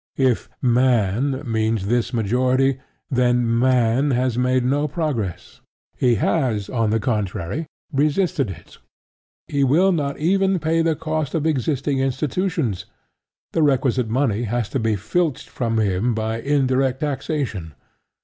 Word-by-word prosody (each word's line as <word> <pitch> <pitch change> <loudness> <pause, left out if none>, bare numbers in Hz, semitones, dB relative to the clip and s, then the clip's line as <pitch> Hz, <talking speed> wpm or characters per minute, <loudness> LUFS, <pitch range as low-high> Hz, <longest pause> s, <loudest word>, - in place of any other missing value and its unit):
If 130 -3 +1
"Man" 125 +1 +2
means 110 -3 0
this 120 +3 0
majority, 130 +4 +1 0.3
then 120 -2 +2
"Man" 125 +2 +3
has 125 -2 +1
made 125 0 +1
no 145 +3 +1
progress: 135 - -4 0.3
he 120 -2 +2
has, 115 - 0
on 115 -4 +1
the 110 +1 +1
contrary, 105 - -2 0.3
resisted 145 - +1
it. 95 - -11 0.7
He 140 -1 0
will 165 +9 +4
not 145 -5 -1
even 190 +4 +2
pay 165 0 +1
the 165 -1 +1
cost 155 -1 -3
of 155 -2 0
existing 140 -2 0
institutions: 135 - -1 0.7
the 165 - 0
requisite 130 -5 +2
money 120 -3 +1
has 115 0 -2
to 135 - -2
be 110 -2 +1
filched 155 - -1
from 115 -2 -2
him 110 +2 +1
by 110 +1 -2
"indirect 135 -2 +1
taxation." 135 - -3
130 Hz, 130 wpm, -21 LUFS, 115-145 Hz, 0.7 s, will